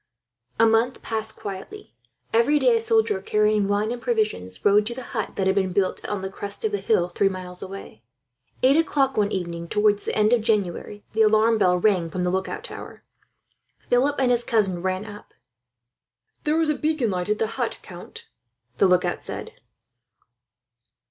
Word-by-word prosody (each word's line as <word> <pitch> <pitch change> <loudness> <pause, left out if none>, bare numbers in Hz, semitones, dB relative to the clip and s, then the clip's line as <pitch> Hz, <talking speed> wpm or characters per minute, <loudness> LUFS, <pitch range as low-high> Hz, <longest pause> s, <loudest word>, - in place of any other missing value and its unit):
A 225 - +6
month 225 +3 +2
passed 220 -1 -2
quietly. 195 -2 -8 0.4
Every 235 +6 +4
day, 475 +9 +4
a 455 - +1
soldier 445 - +1
carrying 210 0 +2
wine 205 +2 0
and 240 0 -5
provisions 215 - -2
rode 205 +1 +4
to 235 - -4
the 260 - -7
hut 220 -3 -3
that 195 - -1
had 190 - +2
been 190 -2 0
built, 190 0 0
on 205 -2 -2
the 190 - -4
crest 200 +2 -5
of 215 - 0
the 205 - -1
hill 195 -3 +2
three 195 +2 +1
miles 180 -1 -7
away. 195 - -9 0.6
Eight 265 +2 +6
o'clock 280 -4 +1
one 210 -1 +1
evening, 170 -2 -4
towards 210 +1 +2
the - - -2
end 215 +2 +4
of 240 - +3
January, 205 -2 -2
the 220 - +1
alarm 220 +1 +4
bell 180 -2 +3
rang 180 -3 +2
from 180 +3 -3
the 180 - 0
lookout 190 - -3
tower. - - -9 0.7
Philip 265 +4 +1
and 260 -2 +2
his 240 -1 +2
cousin 195 -7 +1
ran 185 +2 -2
up. 210 -1 -12 1.1
"There 310 +2 +2
is 320 -1 +2
the 300 - 0
beacon 305 -7 0
alight 180 0 -2
at 210 - +1
the 220 - +1
hut, 230 +2 -3
count," 175 -1 -10 0.5
the 195 - +5
lookout 180 -1 +1
said. - - -6
210 Hz, 180 wpm, -24 LUFS, 190-235 Hz, 1.1 s, A